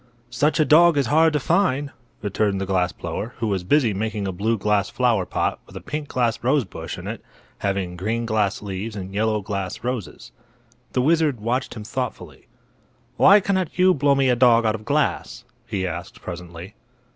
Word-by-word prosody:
"Such 145 Hz, +7 st, +1 dB
a 155 Hz, -, +4 dB
dog 165 Hz, +1 st, +6 dB
is 140 Hz, -, +2 dB
hard 160 Hz, +1 st, +5 dB
to 150 Hz, -, +1 dB
find," 145 Hz, -3 st, +1 dB, 0.3 s
returned 100 Hz, -1 st, 0 dB
the 95 Hz, -, -2 dB
glass 95 Hz, -1 st, +1 dB
blower, 115 Hz, +3 st, -6 dB
who 115 Hz, -, -2 dB
was 95 Hz, -3 st, -1 dB
busy 115 Hz, +2 st, +2 dB
making 105 Hz, 0 st, -3 dB
a -, -, -2 dB
blue 110 Hz, +5 st, -1 dB
glass 105 Hz, -1 st, +1 dB
flower 115 Hz, -7 st, +1 dB
pot -, -, -1 dB
with -, -, -16 dB
a -, -, -5 dB
pink 150 Hz, -1 st, -5 dB
glass 120 Hz, -4 st, -1 dB
rosebush 130 Hz, -, -1 dB
in -, -, -9 dB
it, -, -, -6 dB, 0.4 s
having 95 Hz, -3 st, -2 dB
green 110 Hz, +6 st, -2 dB
glass 110 Hz, -2 st, 0 dB
leaves 100 Hz, +2 st, -5 dB
and 95 Hz, -1 st, -7 dB
yellow 110 Hz, +1 st, 0 dB
glass 100 Hz, -1 st, -4 dB
roses. 120 Hz, -6 st, -5 dB, 0.6 s
The 125 Hz, -, +1 dB
wizard 155 Hz, -4 st, +2 dB
watched 120 Hz, +5 st, -2 dB
him 110 Hz, -, -7 dB
thoughtfully. 105 Hz, -, -6 dB, 0.7 s
"Why 200 Hz, +2 st, +7 dB
cannot 190 Hz, -4 st, -1 dB
you 185 Hz, 0 st, +5 dB
blow 140 Hz, -1 st, +2 dB
me 135 Hz, -1 st, +2 dB
a 125 Hz, -, +4 dB
dog 120 Hz, -2 st, +5 dB
out 110 Hz, -, +2 dB
of 110 Hz, -1 st, -7 dB
glass?" 145 Hz, +4 st, -1 dB, 0.2 s
he 100 Hz, -5 st, -2 dB
asked, 85 Hz, 0 st, -6 dB
presently. 90 Hz, +2 st, -8 dB
110 Hz, 185 wpm, -22 LUFS, 100-140 Hz, 0.7 s, Why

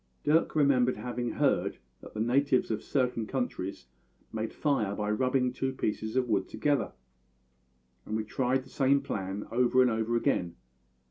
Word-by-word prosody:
Dirk 160 Hz, +2 st, +2 dB
remembered 130 Hz, -4 st, +3 dB
having 120 Hz, -1 st, -3 dB
heard -, -, +1 dB, 0.2 s
that -, -, -12 dB
the -, -, -3 dB
natives 130 Hz, +2 st, +2 dB
of 110 Hz, -, -1 dB
certain 125 Hz, -5 st, -1 dB
countries 110 Hz, -, -3 dB, 0.5 s
made 110 Hz, 0 st, -3 dB
fire 110 Hz, -10 st, 0 dB
by 105 Hz, 0 st, -1 dB
rubbing 125 Hz, +2 st, +1 dB
two 135 Hz, +1 st, -1 dB
pieces 110 Hz, -2 st, -3 dB
of 130 Hz, -1 st, +2 dB
wood 100 Hz, -4 st, 0 dB
together, 145 Hz, -1 st, 0 dB, 1.1 s
and 110 Hz, -, -2 dB
we 110 Hz, -, -2 dB
tried 130 Hz, +4 st, 0 dB
the 130 Hz, -, -17 dB
same 140 Hz, 0 st, +3 dB
plan 100 Hz, -5 st, -4 dB
over 125 Hz, +2 st, +3 dB
and 125 Hz, -1 st, +5 dB
over 110 Hz, +1 st, 0 dB
again. 105 Hz, -9 st, 0 dB
125 Hz, 155 wpm, -29 LUFS, 110-135 Hz, 1.1 s, and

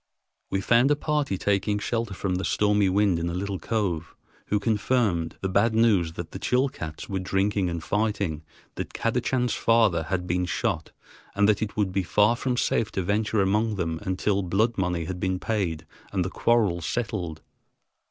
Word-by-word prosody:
We 95 Hz, -, 0 dB
found 120 Hz, +6 st, +4 dB
a 150 Hz, -, +4 dB
party 150 Hz, -8 st, -1 dB
taking 100 Hz, +2 st, +1 dB
shelter 115 Hz, -1 st, -2 dB
from 90 Hz, -1 st, -1 dB
the 95 Hz, -, -3 dB
stormy 105 Hz, -2 st, +2 dB
wind 95 Hz, -2 st, +2 dB
in 85 Hz, +1 st, -1 dB
a 85 Hz, -, -3 dB
little 95 Hz, 0 st, -3 dB
cove, 90 Hz, -8 st, -2 dB, 0.3 s
who 105 Hz, -, +1 dB
confirmed 105 Hz, -5 st, 0 dB
the 95 Hz, -, 0 dB
bad 100 Hz, +4 st, +2 dB
news 100 Hz, -8 st, +3 dB
that 85 Hz, 0 st, -7 dB
the 95 Hz, -, -7 dB
Chilcats 125 Hz, -, -1 dB
were 95 Hz, -1 st, -2 dB
drinking 95 Hz, +1 st, 0 dB
and 85 Hz, -2 st, -4 dB
fighting, 105 Hz, -7 st, -1 dB, 0.4 s
that -, -, -5 dB
Kadachan's 125 Hz, +1 st, 0 dB
father 110 Hz, -8 st, +3 dB
had 90 Hz, +1 st, -2 dB
been 90 Hz, +1 st, 0 dB
shot, -, -, -2 dB, 0.4 s
and 100 Hz, 0 st, +4 dB
that 105 Hz, -1 st, +2 dB
it 110 Hz, -1 st, -3 dB
would 100 Hz, -3 st, +1 dB
be 95 Hz, +1 st, +1 dB
far 105 Hz, +5 st, +3 dB
from 125 Hz, 0 st, -2 dB
safe 115 Hz, -2 st, +1 dB
to 95 Hz, -, -1 dB
venture 105 Hz, +2 st, +1 dB
among 105 Hz, +3 st, +1 dB
them 80 Hz, -4 st, -2 dB
until 95 Hz, +2 st, 0 dB
blood 105 Hz, +6 st, +1 dB
money 90 Hz, -4 st, -1 dB
had 90 Hz, +1 st, -5 dB
been 95 Hz, -1 st, 0 dB
paid 90 Hz, -9 st, -2 dB, 0.3 s
and 95 Hz, -3 st, 0 dB
the 95 Hz, -, -4 dB
quarrels 100 Hz, -8 st, +1 dB
settled. 95 Hz, -9 st, -3 dB
100 Hz, 180 wpm, -26 LUFS, 90-110 Hz, 0.4 s, found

